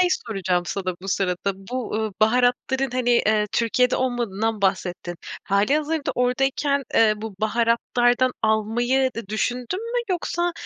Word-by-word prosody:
şey 365 - +4 0.2
soracağım 185 -5 0
sana 185 -1 -3
bu 195 - -7
sırada, 190 0 0
bu, 235 +5 -6
ııı, 220 -1 -1
baharatların, 250 +3 +2
hani, 250 -1 0
eee 215 -3 +3
Türkiye'de 250 +2 +2
olmadığından 225 -4 -1
bahsettin. 180 -2 -1 0.3
Hâlihazırda 290 +10 +1
oradayken 270 +3 +1
eee 220 -1 +5
bu 215 -1 -7
baharatlardan 235 +3 +2
almayı 240 +5 +1
da 230 - -5
düşündün 250 - -2
mü? - - +1
Yoksa, 345 0 -1
235 Hz, 130 wpm, -23 LUFS, 210-255 Hz, 0.3 s, eee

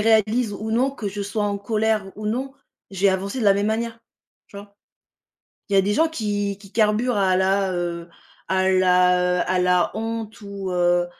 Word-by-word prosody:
réalise 220 +1 +2
ou 215 +2 -5
non, 250 +5 +2
que 255 -6 -7
je 200 +1 -4
sois 205 +1 -2
en 200 -1 -1
colère 215 -1 -1
ou 210 0 -6
non, 255 +5 -2 0.4
je 195 -1 -7
vais 200 - +6
avancer 195 +6 -3
de - - -1
la 200 - +6
même 200 +1 0
manière, 230 +1 -2 0.5
tu - - -14
vois? 200 0 -11 0.9
Il 200 - -4
y - - +5
a - - +6
des 200 +2 0
gens 320 +8 +3
qui 205 -9 -2
qui 200 -1 -16
carburent 220 +2 +1
à 190 -2 +2
la, 190 0 +1
heu 170 -1 -3 0.4
à 190 0 +1
la, 180 -1 +3
heu - - +1
à 185 0 0
la 180 -1 +2
honte 225 0 -5
ou 200 -2 -6
heu, 175 0 +2
200 Hz, 205 wpm, -22 LUFS, 190-220 Hz, 0.9 s, vais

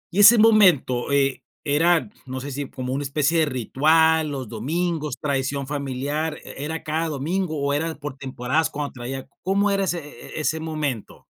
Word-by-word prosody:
y - - +1
ese 210 +3 +9
momento 185 - +4
e 140 -1 +2 0.2
era, 165 +4 +3 0.2
no 130 +1 -4
sé 140 +2 -6
si 140 0 -4
como 130 0 -4
una 140 - -1
especie 150 +4 +1
de 160 - +4
ritual, 155 +5 +3
los 135 -4 -5
domingos, 150 +6 -2
tradición 140 -1 -1
familiar, 145 +2 -3
e 140 - -8
era 160 +1 -4
cada 160 +2 -1
domingo, 160 +3 -2
o 140 0 0
era 160 +2 -1
por 145 -2 -7
temporadas 135 +3 -1
cuando 145 0 -4
traía 130 +2 -6
¿cómo 200 +2 +1
era 195 0 +1
ese 175 -2 -1 0.4
e - - -2
ese 155 +1 0
momento? 155 -8 -4
150 Hz, 175 wpm, -23 LUFS, 135-160 Hz, 0.4 s, ese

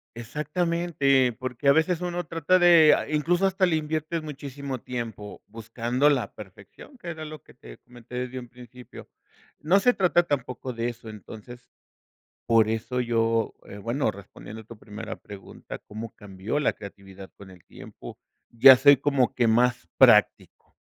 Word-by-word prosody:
Exactamente, 150 0 0
porque 130 +3 -5
a - - +8
veces 160 +3 +1
uno 175 0 -4
trata 165 +3 +1
de, 170 -3 +6
ah, - - -5
incluso 170 +5 +1
hasta 190 0 +1
le 165 - +1
inviertes 155 +1 -3
muchísimo 140 -3 -7
tiempo 115 -5 -7
buscando 115 +5 -1
la 135 -4 -1
perfección, 100 - -14
que 175 - -9
era 160 -1 -7
lo 155 -2 -10
que - - -19
te - - -14
comenté 125 0 -14
desde 125 +1 -4
un 120 -1 -12
principio. 125 0 -14 0.5
No 180 +6 +3
se 245 +3 +3
trata 175 -2 +2
tampoco 130 -4 -4
de 115 +1 -2
eso, 115 -1 -10
entonces, 110 +3 -12 0.8
por 115 -2 +3
eso 115 +3 -3
yo, 115 -1 0
eh, 100 - -11
bueno, 115 +2 -1
respondiendo 105 +2 -12
tu 115 0 -13
primera 110 +1 -8
pregunta, 100 -1 -11
¿cómo 110 +2 -9
cambió 105 +6 -5
la - - +1
creatividad 95 -1 -12
con 100 -1 -14
el 90 -3 -17
tiempo? - - -12 0.3
Ya 130 +3 +8
soy 140 +1 +6
como 140 -3 0
que 120 -2 +1
más 120 +2 +1
práctico, - - +3
125 Hz, 160 wpm, -25 LUFS, 115-155 Hz, 0.8 s, a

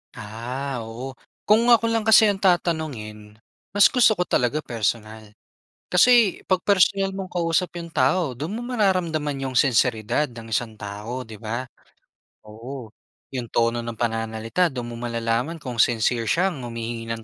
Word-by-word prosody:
Ah, 125 +5 -5
oo 125 +4 -7 0.3
kung 225 +3 +4
ako 230 -1 +5
lang 225 - +1
kasi 220 0 +8
ang 200 -2 +1
tatanungin, 135 - -1 0.4
mas 205 - +7
gusto 235 -4 +4
ko 180 - +2
talaga 125 0 +1
personal. 110 -1 -3 0.6
Kasi 225 +2 +5
'pag 185 -1 +1
personal 195 0 +3
mong 190 -1 -5
kausap 175 +1 0
'yong 170 -1 -6
tao 140 +4 +2
doon 160 +9 -4
mo 240 - -5
mararamdaman 170 - 0
'yong 130 -2 0
sinseridad 125 +1 +2
ng 115 -1 -10
isang 110 -3 -2
tao 105 +5 -6
'di 110 - -10
ba? 115 +4 -4 0.8
Oo, 115 +2 -9 0.4
'yong 125 -2 -4
tono 115 0 +1
ng 115 0 -6
pananalita 115 +7 -1
do'n 120 -5 -6
mo - - -7
malalaman 115 +5 -2
kung 125 -7 -7
sincere 115 0 +2
siyang 175 - +1
humihingi 115 -1 -5
ng 115 - -11
130 Hz, 150 wpm, -23 LUFS, 115-180 Hz, 0.8 s, kasi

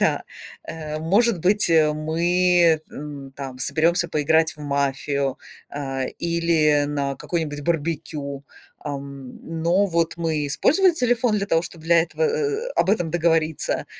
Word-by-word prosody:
Да. - - +1 0.4
Э, 155 -1 -6
может 195 +5 +2
быть, 195 +1 +2
э, 155 -2 +4
мы, 170 +1 +2
м, 140 -2 -8
там 135 -2 -7
соберемся 170 +6 +1
поиграть 160 +1 +2
в 150 - -14
мафию, 140 -1 -1 0.3
а, 135 -2 -3
или 165 -3 +2
на 140 -1 -2
какой-нибудь 150 -1 -3
барбекю, 150 -3 -3 0.4
ам, 140 -3 -7 0.3
но 180 +5 +3
вот 170 -3 0
мы 160 -3 -1
использовали 325 - +3
телефон 245 -5 +1
для 200 -1 -1
того, 165 -4 +2
чтоб 170 -2 -9
для 165 0 +4
этого, 170 - -5
э, - - +4
э, 440 -1 -1
э, - - -11
об - - +3
этом 175 -6 0
договориться, 165 -2 0
160 Hz, 145 wpm, -23 LUFS, 145-175 Hz, 0.4 s, э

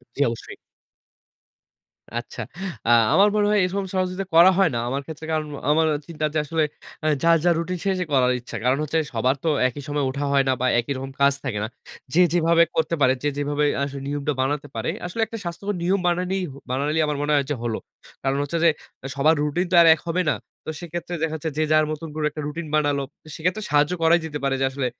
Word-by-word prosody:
জ্বি 145 - 0
অবশ্যই। 115 -1 -6 1.6
আচ্ছা। 120 - -8 0.5
আ - - +4 0.2
আমার 200 +2 +6
মনে 210 - +3
হয় 210 -1 +4
এরকম 195 +2 -1
সহযোগিতা 185 +1 -1
করা 170 +3 +8
হয় 195 -4 +4
না। - - 0
আমার 135 +3 -1
ক্ষেত্রে 160 0 -8
কারন 155 -1 -1 0.2
আমার 160 +1 +4 0.2
চিন্তার 155 -2 -2
যে - - +1
আসলে 160 +1 +1 0.4
অ্যা 155 - +2
যার, 165 0 +5
যার 175 -1 +4
রুটিন 180 +2 -3
সে, 200 - +2
সে - - 0
করার 125 -2 +4
ইচ্ছা। 120 - -8
কারণ 130 +2 +3
হচ্ছে 155 +2 0
সবার 125 +3 +2
তো - - +2 0.2
একই 135 +3 -8
সময় 145 -1 0
ওঠা 140 +2 -3
হয় 140 -1 +4
না - - +4
বা 130 - +1
একই 120 +4 -4
রকম 135 +1 -6
কাজ 140 0 +5
থাকে 120 -6 -2
না। - - -3 0.5
যে 175 - +5
যেভাবে 170 -1 +4
করতে 160 +1 +1
পারে, 130 -2 +5
যে 145 - +1
যেভাবে 145 +1 0 0.2
আসলে 140 0 -4
নিয়মটা 145 +1 -1
বানাতে 145 +2 -1
পারে। - - -1 0.2
আসলে 180 +6 -5
একটা 225 +1 -7
স্বাস্থ্যকর 195 +4 -3
নিয়ম 185 +3 +2
বানানেই 180 +2 0
হ - - -13 0.2
বানাইলেই 145 +5 +1
আমার 150 -1 -1
মনে 150 +1 0
হয় 140 -1 +3
যে - - +1
হলো। 115 -2 -2 0.4
কারণ 135 +1 0
হচ্ছে 145 +4 -2
যে - - +7 0.3
অ্যা 135 - -7
সবার 155 +4 +4
রুটিন 150 +5 0
তো 185 - 0
আর 165 - +5
এক 155 - -10
হবে 180 +2 +1
না। - - +1 0.3
তো - - -4
সেক্ষেত্রে 175 0 -5
দেখা 160 -1 0
যাচ্ছে 160 - -1
যে 155 - +2
যার 155 0 +5
মতন 155 +1 -5
করে 155 -1 -1
একটা 150 +1 -6
রুটিন 160 +3 -5
বানালো। 145 -2 +1 0.2
তো - - -16
সেক্ষেত্রে 180 +6 -1
সাহায্য 150 +3 +3
করাই 165 +1 +5
যেতে 150 -2 -4
পারে। 135 -1 +1
যে - - +2
আসলে 135 -1 -2
155 Hz, 225 wpm, -23 LUFS, 140-170 Hz, 1.6 s, করা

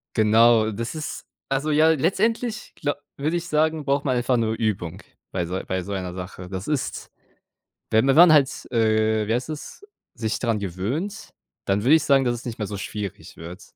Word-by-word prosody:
Genau, 110 0 +5
das 115 +8 -5
ist 155 - -6 0.3
also, 145 +3 0
ja, 155 +2 +5
letztendlich, 215 - 0
gla 145 -2 -2 0.2
würde 155 +5 -1
ich 170 0 -5
sagen, 155 0 +1
braucht 140 +1 0
man 130 -2 +1
einfach 125 0 +1
nur 110 -1 0
Übung 95 -6 -2 0.3
bei 90 -2 -1
so 90 +2 -3
bei 95 0 -1
so 100 - -5
einer 90 -2 -4
Sache. 90 0 -8
Das 95 +1 -5
ist, 150 -3 -3 0.8
wenn 110 0 +4
man 135 - +4
dann 170 0 +9
halt, 140 -3 +3
äh, 110 -2 +2
wie 110 - 0
heißt 125 +4 -2
das, 155 - -8 0.3
sich 110 -1 -2
dran 115 -3 0
gewöhnt, 115 - -4 0.3
dann 100 +1 0
würde 145 - +6
ich 160 -2 +3
sagen, 135 -2 +4
dass 120 -1 +1
es 120 - -8
nicht 115 -2 -6
mehr 105 - -2
so 100 - -5
schwierig 100 -2 -6
wird, 85 +3 -9
115 Hz, 195 wpm, -24 LUFS, 100-150 Hz, 0.8 s, dann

